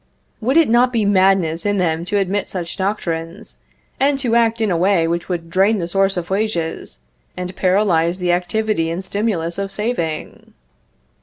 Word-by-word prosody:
Would 255 +7 +1
it 330 - +5
not 240 +2 +3
be 225 -4 +1
madness 190 -4 +3
in 205 0 0
them 165 -2 0
to 205 - 0
admit 195 +1 -1
such 175 -2 -5
doctrines, 190 -1 -4 0.4
and 275 +1 +2
to 245 -4 0
act 230 -1 +2
in 220 -3 +1
a - - +1
way 175 -1 +2
which 170 +1 -2
would 170 -2 -3
drain 195 +5 +3
the 170 -3 -3
source 195 +1 +1
of 175 +1 -4
wages, 180 - -2 0.4
and 180 0 -5
paralyze 180 -3 +2
the 180 -1 0
activity 180 0 0
and 175 +3 -4
stimulus 190 -5 -2
of 195 0 -3
saving? 195 -7 -4
190 Hz, 170 wpm, -19 LUFS, 170-215 Hz, 0.4 s, it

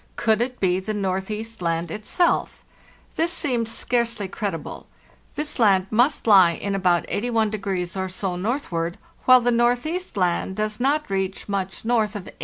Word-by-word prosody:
Could 220 -1 +2
it 250 +1 -2
be 185 -1 +2
the 215 +3 -4
Northeast 205 +3 -3
Land 165 -1 -1
itself? 215 - 0 0.5
Thisseemed 305 -9 0
scarcely 235 -3 -1
credible. 190 -6 -5 0.5
This 300 -2 -3
land 195 -5 +4
must 245 +7 +2
lie 190 -6 +7
in 200 +4 -3
about 180 -3 +2
81 225 0 0 0.4
or 190 0 -2
so 185 0 -3
northward, 180 -5 -2 0.3
while 255 -1 +7
the 245 +1 +2
Northeast 245 - 0
Land 180 +1 0
does 215 0 -2
not 285 +4 +1
reach 190 0 -2
much 195 0 -3
north 225 -3 +1
of 205 - -5
80°. - - -11
215 Hz, 150 wpm, -23 LUFS, 190-240 Hz, 0.5 s, lie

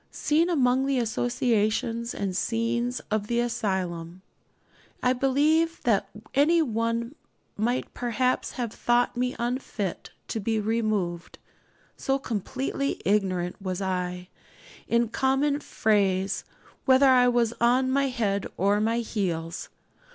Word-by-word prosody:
Seen 320 +4 +1
among 265 -4 +2
the 275 -1 +1
associations 235 -1 0
and 190 -2 -2
scenes 235 +3 -1
of 210 -1 0
the 235 +1 0
asylum, 185 -6 -2 0.8
I 250 - +4
believe 300 +6 +2
that 220 -5 +2 0.2
any 305 +5 +4
one 230 -2 -1 0.4
might 240 +4 -1
perhaps 245 +1 -1
have 235 -3 -3
thought 240 +1 +1
me 250 +1 -1
unfit 235 -5 -3 0.2
to 225 - -2
be 220 +1 0
removed, 210 -6 -1 0.6
so 270 0 0
completely 265 +4 -3
ignorant 190 -2 0
was 185 -1 -3
I, 180 -1 -3 0.6
in 235 -1 +2
common 270 +4 +1
phrase, 195 -7 +1 0.4
whether 265 0 +6
I 250 -1 +6
was 240 -2 +2
on 255 +2 +3
my 275 +1 +2
head 210 -6 -1
or 200 +3 +2
my 230 +2 +1
heels. 175 -7 -3
235 Hz, 120 wpm, -26 LUFS, 200-255 Hz, 0.8 s, whether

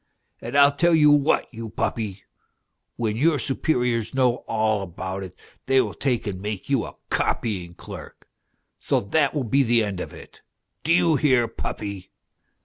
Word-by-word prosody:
And 140 - -2
I 140 0 +7
tell 170 +3 +3
you 150 -2 +6
what, 145 0 +3
you 115 -1 -6
puppy, 105 -2 -3 0.7
when 110 -3 -1
your 155 +4 +3
superiors 125 -3 0
know 125 -2 +3
all 110 -2 +1
about 95 +1 -5
it 95 -2 -8 0.3
they 135 0 +4
will - - 0
take 125 -5 -1
and 95 -3 -4
make 105 +4 -5
you 135 -5 +2
a - - -10 0.2
copying 90 -7 -1
clerk; - - -11 0.5
so - - +1
that 145 +8 +1
will 145 - 0
be 135 +4 +2
the 120 -3 +3
end 100 -3 -3
of - - -5
it! - - -14 0.4
Do 160 - 0
you 165 -2 +4
hear, 130 -6 +3
puppy 100 -4 -6
120 Hz, 165 wpm, -24 LUFS, 105-140 Hz, 0.7 s, I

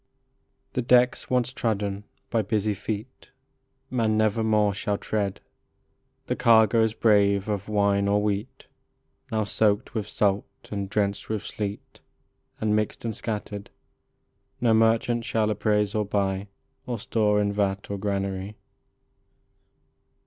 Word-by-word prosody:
The 125 - 0
decks 125 0 +3
once 125 0 +1
trodden 105 -5 -2 0.3
by 115 - +2
busy 105 0 0
feet 105 +5 -6 0.6
Man 110 -4 +1
nevermore 110 -1 +2
shall 100 +1 -1
tread; 100 -3 -2 0.8
The - - -1
cargoes 110 -2 +4
brave 100 -3 +3
of 105 -1 -3
wine 100 -1 +2
or 100 +1 +3
wheat, 105 +3 -3 0.7
Now 110 -1 +1
soaked 105 0 +1
with 110 -3 -2
salt 100 -1 -1
and 100 -2 -3
drenched 100 -1 -1
with 110 -2 -2
sleet, 105 -1 -6 0.6
And 105 -1 +1
mixed 105 +2 -2
and 110 -2 -2
scattered, 105 -2 -5 0.9
No 120 -2 +3
merchant 115 +1 +3
shall 110 -1 0
appraise 105 -1 +1
or 105 - +1
buy 100 -1 -1 0.4
Or 120 -2 -2
store 105 -2 +1
in 100 0 +1
vat 100 -1 -1
or 100 - -3
granary. 100 0 -2
105 Hz, 125 wpm, -26 LUFS, 100-110 Hz, 0.9 s, cargoes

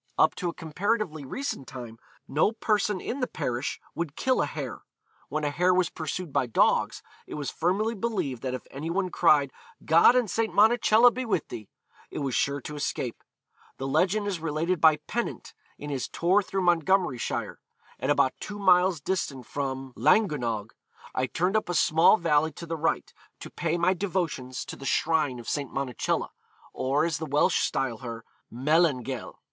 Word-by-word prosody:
Up - - +4
to 180 - -3
a - - -5
comparatively 165 -1 -2
recent 200 - -4
time, 120 -3 -9 0.3
no 155 +10 +2
person 210 -3 0
in 255 - -4
the 250 - 0
parish 125 -3 -3
would 165 -4 -4
kill 260 0 +1
a - - 0
hare. - - -6 0.5
When 155 0 -2
a 145 - 0
hare 180 +5 +2
was 180 -2 +1
pursued 160 0 -5
by 125 - +1
dogs, 115 - +2 0.2
it - - -7
was 145 -2 -3
firmly 200 +7 0
believed 190 - -2
that 130 -1 -2
if 130 - -8
any 145 +4 -5
one 185 +1 -1
cried, 145 -6 +3 0.3
'God 165 +9 +6
and 250 -3 +3
St. 225 +3 -1
Monacella 225 +2 +5
be 255 - -3
with 210 - -1
thee,' 110 -4 -8 0.4
it - - -8
was 135 -3 -2
sure 140 0 +1
to 150 - -7
escape. 135 -5 -3 0.5
The 135 - -4
legend 185 +9 +1
is 195 -4 -2
related 165 +2 -1
by 160 -1 +7
Pennant, 240 +1 -4 0.2
in 145 0 -6
his 135 -3 -2
tour 185 +5 +2
through 195 -1 -3
Montgomeryshire: 175 -5 +1 0.4
'At 130 - -2
about 135 -2 +3
two 205 - -6
miles 180 -4 +4
distant 140 -7 -2
from 135 -1 -4
Llangynog, 120 - +1 0.4
I 130 0 0
turned 180 +8 0
up 215 - 0
a 175 - -1
small 160 +6 +5
valley 160 -3 +2
to 170 - -8
the 165 0 -3
right, 160 +1 -1 0.3
to - - -9
pay 170 0 -1
my 175 +2 +3
devotions 170 -9 -3
to - - -7
the - - -12
shrine 155 -5 +1
of 120 - -10
St. 145 -2 -2
Monacella, 135 -3 -2 0.4
or, 140 +4 +1
as 165 -3 -1
the 160 - -4
Welsh 150 +5 +2
style 125 -3 -1
her, 115 -3 -7 0.3
Melangell.... 135 -1 0
160 Hz, 175 wpm, -27 LUFS, 135-185 Hz, 0.5 s, by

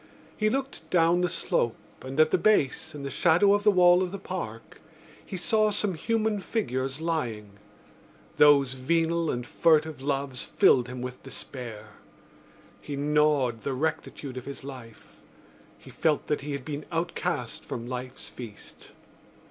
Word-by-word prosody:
He 215 0 +1
looked 270 +3 -4
down 170 0 +3
the 180 - +1
slope 115 -7 0 0.3
and, 135 +3 -6
at 155 0 +5
the - - +3
base, 165 -9 +2
in 145 - -7
the 140 - -4
shadow 180 +4 +4
of 205 0 +1
the 210 - +6
wall 180 -2 +6
of 185 -1 -1
the 200 - -4
Park, 170 - -7 0.4
he 190 - -6
saw 215 +4 +2
some 205 -1 0
human 220 +4 0
figures 135 - -2
lying. 115 -12 -3 0.8
Those 140 -3 +6
venal 165 +5 +1
and 120 0 -2
furtive 155 0 +2
loves 135 -2 -2
filled 125 -2 +4
him 125 0 -6
with 125 0 -6
despair. 120 -5 -8 0.9
He 145 - -5
gnawed 145 -5 +2
the 140 - -2
rectitude 145 -2 -3
of 125 - -6
his 140 0 -7
life; 125 -5 -11 0.6
he - - -14
felt 155 -3 +1
that 150 - -1
he 145 +1 -4
had 140 -2 -5
been 150 0 -5
outcast 165 -6 -2
from 115 - -6
life's 125 +1 -6
feast. 115 -5 -11
145 Hz, 155 wpm, -27 LUFS, 130-175 Hz, 0.9 s, the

